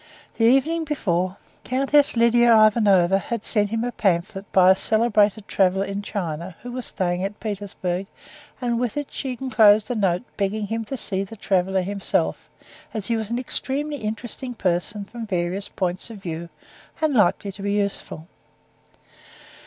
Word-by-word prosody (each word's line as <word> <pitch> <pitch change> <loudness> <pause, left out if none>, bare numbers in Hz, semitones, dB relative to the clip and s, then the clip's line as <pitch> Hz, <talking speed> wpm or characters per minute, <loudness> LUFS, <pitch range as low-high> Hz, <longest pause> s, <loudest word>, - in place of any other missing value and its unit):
The 225 - +4
evening 275 +7 +3
before, 185 - -1 0.3
Countess 275 +1 +3
Lidia 235 -1 +5
Ivanovna 195 -4 +4
had 230 +2 -4
sent 205 -2 +2
him 225 +1 -1
a 245 - -2
pamphlet 195 -1 -1
by 185 -1 +6
a - - +5
celebrated 215 -1 +2
traveler 190 0 +2
in 200 +1 -4
China, 175 -3 -5
who 245 - -6
was 250 0 -5
staying 180 -2 -2
in 195 +2 -3
Petersburg, 195 -3 -4 0.5
and 240 -2 -1
with 245 +1 -2
it 290 -1 -3
she 255 -2 -4
enclosed 220 -4 +4
a - - +1
note 190 -2 +1
begging 205 +1 -1
him 225 +2 -3
to 270 - -5
see 195 -4 -1
the 200 +3 -10
traveler 190 -2 0
himself, 200 +1 -1 0.5
as 215 -3 -3
he 230 - 0
was 220 -2 -3
an 235 - -1
extremely 285 +3 -2
interesting 235 +3 -5
person 190 +2 -1
from 230 +2 -8
various 185 +1 -2
points 185 +2 -3
of 225 - -9
view, 170 0 -5 0.5
and 310 -2 +1
likely 205 -2 +2
to 195 - -10
be 200 0 -1
useful. 200 -5 -3
205 Hz, 160 wpm, -23 LUFS, 190-235 Hz, 0.5 s, by